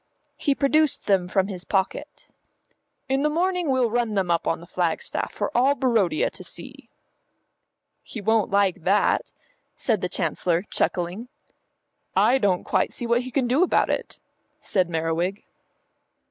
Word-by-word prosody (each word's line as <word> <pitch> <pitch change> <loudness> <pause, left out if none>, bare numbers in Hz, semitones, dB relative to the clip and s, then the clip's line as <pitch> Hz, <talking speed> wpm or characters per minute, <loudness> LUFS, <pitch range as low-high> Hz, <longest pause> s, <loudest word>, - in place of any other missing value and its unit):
He 280 - 0
produced 300 +1 +2
them 190 -3 +2
from 190 0 +1
his 185 -3 -6
pocket. 190 -1 -3 0.8
"In 270 +1 +1
the 300 - +2
morning 355 +1 0
we'll 255 -4 +2
run 235 -2 0
them 185 -3 0
up 170 - 0
on 165 - 0
the 170 - -12
flagstaff 175 -2 -2
for - - -4
all 265 +4 +4
Barodia 230 - +1
to - - -10
see." - - -10 1.1
"He 225 - -8
won't 220 +1 +1
like 200 -2 +1
that," 200 +4 +2 0.4
said 220 -6 0
the 180 - -2
Chancellor, 175 -1 0
chuckling. 185 +2 -2 0.9
"I 265 +2 +4
don't 190 -5 +1
quite - - 0
see 240 - -4
what 235 +1 +2
he 255 - -7
can 255 -1 0
do 260 +7 +2
about 365 - +2
it," - - -4 0.4
said 185 -3 0
Merriwig. 165 +4 -2
210 Hz, 150 wpm, -24 LUFS, 180-255 Hz, 1.1 s, all